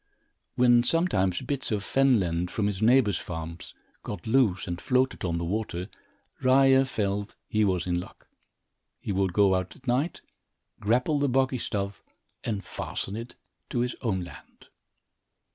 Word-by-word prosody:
When 120 -1 +5
sometimes 120 - +1
bits 140 -4 -2
of 105 -2 -1
fen 135 -1 +3
land, 85 -1 -1
from 105 +2 -1
his 100 -1 -2
neighbor's 110 -5 +4
farms, 80 0 -7 0.3
got 105 - -7
loose 110 -5 +2
and 85 0 -4
floated 130 0 +1
on 85 -2 -1
the 85 - -2
water, 95 -1 -3 0.5
Ryer 135 +1 +5
felt 100 -4 -2
he 110 0 +1
was 95 -4 +1
in 90 -1 0
luck. 90 - -11 0.7
He - - -4
would 95 -1 +1
go 100 +1 +4
out 95 -1 -2
at 135 - -20
night, 130 +7 0 0.6
grapple 125 +7 +1
the 145 -1 +1
boggy 130 0 +1
stuff 100 -2 -3 0.4
and 105 -3 -3
fasten 100 - -4
it 115 +2 -7 0.3
to 120 - 0
his 125 0 -1
own 100 -7 0
land. 85 - -14
105 Hz, 155 wpm, -27 LUFS, 95-130 Hz, 0.7 s, When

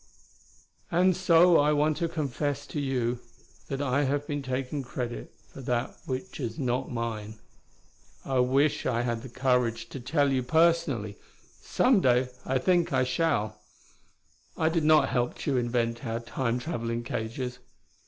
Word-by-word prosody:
"... - - -31
and 180 +1 +4
so 175 -1 +5
I 150 +1 +3
want 150 +1 +2
to 170 +1 -1
confess 145 -2 -2
to 150 - -5
you 125 -3 -1 0.5
that 135 +1 -3
I 140 +1 +1
have 145 +2 0
been 145 -1 -3
taking 130 +2 -3
credit 120 -2 -5 0.2
for 135 - -9
that 125 0 -2
which 130 +8 -4
is 115 -4 -4
not 130 -1 -1
mine. 110 -3 -4 0.9
I 135 -1 0
wish 135 +4 +2
I 120 -2 +1
had 120 -2 -2
the 130 - -9
courage 125 -2 0
to 135 - -7
tell 140 +3 +1
you 130 -1 +1
personally; 150 -7 +1 0.4
someday 130 - +3 0.2
I 130 - +2
think 175 +6 +2
I - - +3
shall. 130 -5 0 1.0
I 160 - +2
did 165 -1 0
not 155 0 +5
help 125 -1 0
Tugh 135 -3 0
invent 120 0 -1
our 115 -2 -2
Time 115 +1 -2
traveling 120 -4 -3
cages. 125 +2 -4
130 Hz, 155 wpm, -28 LUFS, 120-150 Hz, 1.0 s, so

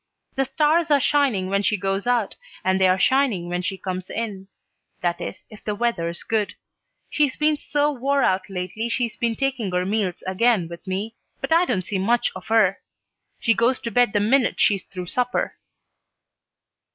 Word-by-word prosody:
The 270 - 0
stars 310 +4 +2
are 290 -1 +5
shining 275 -9 +2
when 200 0 +2
she 210 +1 +1
goes 195 +3 -2
out 240 -4 +1 0.3
and 190 0 +1
they're 185 0 +4
shining 220 -5 +2
when 175 0 -1
she 185 +2 -3
comes 185 -1 -5
in; 205 -4 -4 0.5
that 175 -1 -1
is, - - -6
if 215 - -13
the 210 - -2
weather's 175 -7 -1
good. 215 -2 -1 0.6
She's 290 -3 +1
been 300 -1 +2
so 295 0 +1
wore 275 +1 +1
out 190 -1 +1
lately 195 +5 -4
she's 235 -1 -1
been 230 -1 -1
taking 260 -7 -1
her 180 0 0
meals 195 -3 -1
again 190 -1 +2
with 170 +3 -11
me, 200 +4 -3 0.3
but - - 0
I 340 +2 +5
don't 185 - -1
see 195 -1 -2
much 230 +5 +2
of 185 - -9
her. 215 -4 +3 0.6
She 230 - +3
goes 235 +4 +2
to 230 - -4
bed 245 -1 +3
the 205 - +3
minute 245 +5 +2
she's 200 -3 +3
through 180 -2 -7
supper." 245 +7 -1
215 Hz, 180 wpm, -23 LUFS, 190-250 Hz, 0.6 s, are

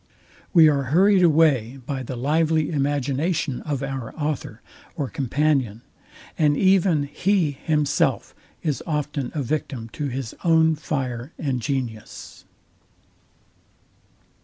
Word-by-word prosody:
We 165 -4 +7
are 140 -2 +2
hurried 190 +5 +4
away 150 -7 +3
by 135 -1 -3
the 130 +1 -6
lively 155 +4 +1
imagination 145 +1 -1
of 140 -3 -3
our 135 -4 -5
author 150 -2 -4 0.3
or 140 -3 -3
companion; 135 -4 0 0.6
and 150 -2 +3
even 185 -5 +3
he 170 +3 +1
himself 150 +1 0 0.3
is 150 -4 -1
often 150 -4 -2
a 145 - -1
victim 125 -3 -3
to 145 +5 -4
his 130 -3 -5
own 160 -1 +4
fire 135 -3 -4
and 135 -5 -2
genius. 120 -5 -5
145 Hz, 110 wpm, -23 LUFS, 130-160 Hz, 0.6 s, We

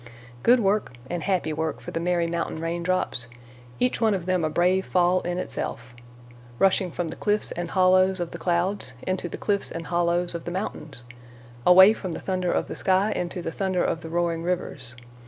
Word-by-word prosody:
Good 245 - +5
work 200 - +1 0.2
and 175 -1 -2
happy 180 -5 0
work 160 +1 -2
for - - -8
the - - -2
merry 175 0 +1
mountain 170 -1 -3
raindrops, 170 -6 -1 0.5
each 250 -1 +1
one 220 -3 +3
of 180 -3 -4
them 185 -2 +1
a 155 - +1
brave 180 +4 +2
fall 180 0 +2
in 175 0 -3
itself, 125 -8 -4 0.6
rushing 190 +1 +3
from 170 0 -3
the - - -6
cliffs 210 0 0
and 175 -1 -4
hollows 185 +1 +4
of 175 -1 -3
the - - -7
clouds 175 -5 0
into 185 -2 -2
the - - -6
cliffs 200 -1 0
and 165 0 -6
hollows 175 0 0
of 170 - -6
the - - -3
mountains; 155 - -5 0.6
away 190 +4 +9
from 185 -6 -5
the - - -5
thunder 185 -2 -1
of - - 0
the - - -6
sky 195 +2 +2
into 180 -2 -3
the 165 - -3
thunder 190 0 0
of 165 - -1
the 160 - -8
roaring 170 0 0
rivers. 165 -9 -3
175 Hz, 195 wpm, -25 LUFS, 165-190 Hz, 0.6 s, away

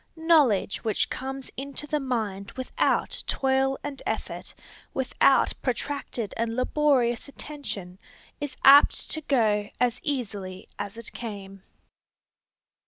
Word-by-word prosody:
Knowledge 305 - +3
which 220 -2 0
comes 270 0 -5
into 280 +2 -5
the 300 0 -1
mind 220 -7 -3
without 260 -1 0
toil 270 0 +2
and 285 -2 -5
effort, - - -4 0.4
without 265 +1 +3
protracted 250 -4 -3
and 230 0 -1
laborious 255 -2 +2
attention, 240 -11 -6 0.4
is 290 -2 -5
apt 280 +2 +7
to 315 - -1
go 215 -8 +2
as 245 0 +1
easily 205 - -3
as 200 +2 -5
it 230 - -7
came. 195 -4 -7
255 Hz, 110 wpm, -26 LUFS, 215-280 Hz, 0.4 s, apt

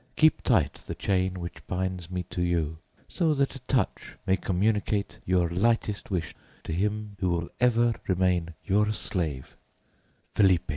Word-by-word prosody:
Keep 155 0 +4
tight - - +2
the - - -4
chain 95 -1 0
which 85 0 -8
binds 90 -2 -2
me 90 -1 -2
to 90 - -2
you, 80 -3 0 0.3
so 160 -4 +1
that 140 -1 +1
a - - -7
touch 130 - -1
may 95 - +4
communicate 100 +2 0
your 90 -1 +3
lightest 105 +3 0
wish 90 -5 -2 0.3
to 80 - -4
him 105 +3 -1
who 95 - +1
will 85 -1 -1
ever 120 -1 +4
remain 90 -3 +1
your 105 +2 +3
slave, 80 -10 -3 0.8
FELIPE. 95 -5 +4
95 Hz, 150 wpm, -28 LUFS, 90-105 Hz, 0.8 s, Keep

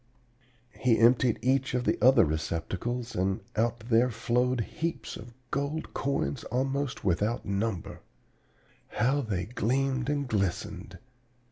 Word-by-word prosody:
"He 120 -3 +3
emptied 120 0 +4
each 130 0 +1
of 125 - 0
the - - +2
other 125 -4 +7
receptacles, 90 +10 -3
and 95 +3 0
out 115 +1 0
there 115 +2 +3
flowed 120 +2 +1
heaps 165 +9 -4
of 115 +2 -11 0.2
gold 140 +3 -2
coins 140 -1 -1
almost 135 +2 -2
without 105 +6 0
number! 100 -1 -2 0.9
How 135 +4 +1
they 100 -8 -2
gleamed 130 +3 0
and 145 -2 0
glistened! 100 -6 -2
120 Hz, 120 wpm, -29 LUFS, 110-130 Hz, 0.9 s, other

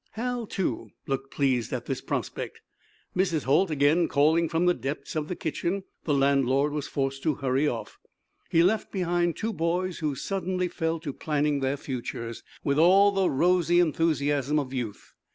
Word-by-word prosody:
Hal, 240 0 -3
too, 125 - -2 0.2
looked 135 0 -3
pleased 130 -5 0
at - - -3
this - - -3
prospect. - - -4 0.6
Mrs. 180 -6 +1
Holt 155 +8 +3
again 155 +3 +3
calling, 160 +3 +3
from 165 +2 +1
the 180 - +5
depths 140 0 -5
of 155 -1 -1
the 180 - -3
kitchen, 175 +5 -2 0.2
the 150 - +1
landlord 140 +1 +2
was 150 -2 -3
forced 135 -1 -2
to 155 - +1
hurry 135 +1 +1
off. 120 -5 -4 0.5
He 165 - +4
left 215 +5 +1
behind 175 -2 0
two 225 +1 -2
boys 175 +2 -1
who 150 -3 -1
suddenly 185 +3 -2
fell 165 -1 -2
to 145 -4 -4
planning 150 -1 0
their 135 +1 0
futures 115 -4 -5 0.2
with 140 +1 +1
all 195 +5 +6
the 195 -2 +2
rosy 175 +3 +3
enthusiasm 150 -4 +1
of 135 -3 -2
youth. 120 -6 -5
155 Hz, 170 wpm, -27 LUFS, 140-175 Hz, 0.6 s, all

